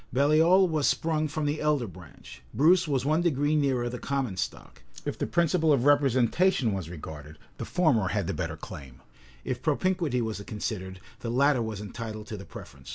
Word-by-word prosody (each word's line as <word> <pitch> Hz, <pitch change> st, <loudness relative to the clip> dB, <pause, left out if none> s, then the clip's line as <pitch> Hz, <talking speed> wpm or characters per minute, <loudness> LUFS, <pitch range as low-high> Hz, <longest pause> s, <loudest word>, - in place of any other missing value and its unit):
Baliol 160 Hz, +8 st, +4 dB
was 155 Hz, -4 st, +1 dB
sprung 155 Hz, -1 st, +1 dB
from 155 Hz, 0 st, -3 dB
the 145 Hz, +1 st, -1 dB
elder 150 Hz, -4 st, +1 dB
branch: 90 Hz, -5 st, -13 dB
Bruce 170 Hz, +5 st, +4 dB
was 135 Hz, -3 st, 0 dB
one 155 Hz, +3 st, +2 dB
degree 150 Hz, -3 st, +1 dB
nearer 135 Hz, -5 st, +1 dB
the 120 Hz, 0 st, -5 dB
common 135 Hz, -8 st, -2 dB
stock: 90 Hz, -, -6 dB, 0.2 s
if -, -, -2 dB
the -, -, -3 dB
principle 170 Hz, -1 st, +2 dB
of 135 Hz, -3 st, +2 dB
representation 140 Hz, -, +3 dB
was 95 Hz, -4 st, -4 dB
regarded, 75 Hz, -2 st, -9 dB, 0.2 s
the -, -, -4 dB
former 145 Hz, -, +2 dB
had 90 Hz, -, -1 dB
the -, -, -2 dB
better -, -, -4 dB
claim: 65 Hz, -2 st, -10 dB, 0.4 s
if 125 Hz, -1 st, -3 dB
propinquity 165 Hz, -3 st, 0 dB
was 110 Hz, -3 st, -3 dB
considered, 100 Hz, -3 st, -5 dB, 0.2 s
the 115 Hz, -, -5 dB
latter 135 Hz, +1 st, +3 dB
was 110 Hz, -3 st, -4 dB
entitled 110 Hz, 0 st, -7 dB
to 110 Hz, -, -6 dB
the 100 Hz, -1 st, -9 dB
preference. 70 Hz, -5 st, -12 dB
130 Hz, 180 wpm, -27 LUFS, 105-155 Hz, 0.4 s, Baliol